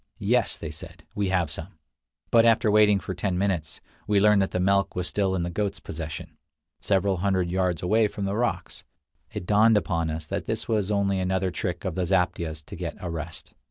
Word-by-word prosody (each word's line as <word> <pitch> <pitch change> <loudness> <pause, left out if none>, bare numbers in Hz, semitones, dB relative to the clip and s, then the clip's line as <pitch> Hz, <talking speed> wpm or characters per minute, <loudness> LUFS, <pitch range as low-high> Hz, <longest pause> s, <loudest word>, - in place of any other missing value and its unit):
"Yes," - - +1
they 80 - -6
said; 75 - -10
"we 100 -2 -1
have 90 -5 +1
some": 80 +2 -6 0.5
but 115 -1 +6
after 115 -1 +4
waiting 105 -1 +5
for 95 +1 -5
ten 90 0 -2
minutes, 90 -6 -2 0.3
we 105 -1 +3
learned 105 0 +5
that 95 - +1
the 90 - -2
milk 100 +1 +2
was 90 -1 -1
still 95 -1 0
in 90 - -1
the 85 - -3
goats' 100 +2 -2
possession, 80 -2 -7 0.4
several 95 -1 +1
hundred 95 -1 0
yards 90 -2 0
away 110 +4 +3
among 100 -1 -5
the 100 +1 -1
rocks. 120 +2 -2 0.5
It - - -5
dawned 105 +3 +5
upon 85 -5 0
us 80 0 -4
that - - -4
this - - -3
was 105 -3 0
only 100 -2 +1
another 95 0 0
trick 90 +1 -4
of 95 - -1
the 90 +1 -1
zaptiehs 80 -3 0
to - - -9
get - - -5
a 90 - -5
rest. 80 0 -7
95 Hz, 205 wpm, -26 LUFS, 85-100 Hz, 0.5 s, but